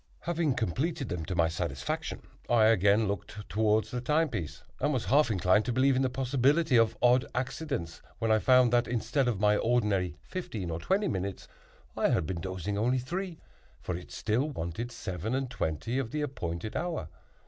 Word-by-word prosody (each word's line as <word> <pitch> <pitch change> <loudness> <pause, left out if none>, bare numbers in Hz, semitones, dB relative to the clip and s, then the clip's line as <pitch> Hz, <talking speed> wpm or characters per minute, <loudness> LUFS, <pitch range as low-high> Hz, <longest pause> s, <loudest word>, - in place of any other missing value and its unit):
Having 165 -5 0
completed 135 - -1
them 85 -2 -3
to 90 - -3
my 85 -1 +3
satisfaction, 80 -6 -3 0.3
I 115 -2 +5
again 105 0 +4
looked 100 +2 -5
toward 110 0 +2
the 125 - -5
time 155 +5 +2
piece 90 - -5 0.2
and 150 - +1
was 130 -5 -1
half 145 0 +4
inclined 95 +1 +3
to 125 - -1
believe 130 +2 +3
in 130 - +2
the 130 - +2
possibility 135 +4 +2
of 115 -1 +4
odd 125 +1 +5
accidents 130 - -3 0.2
when 115 -1 0
I 110 - +5
found 125 0 +5
that, 120 0 +3
instead 125 +3 0
of 115 -6 0
my 105 0 +4
ordinary 105 -8 +1
fifteen 110 - -5
or 80 - -3
twenty 195 - +1
minutes, 95 0 -3 0.5
I - - +2
had - - +1
been 85 0 -4
dozing 95 +2 -3
only 125 +4 +2
three; 170 +7 -4 0.4
for 90 - -4
it 90 - -9
still 120 +8 0
wanted 115 - -4
seven 105 0 -4
and 135 -2 -2
twenty 115 - -2
of 130 -4 -2
the 150 +3 -2
appointed 100 - -4
hour. 165 - -2
115 Hz, 185 wpm, -29 LUFS, 95-135 Hz, 0.5 s, I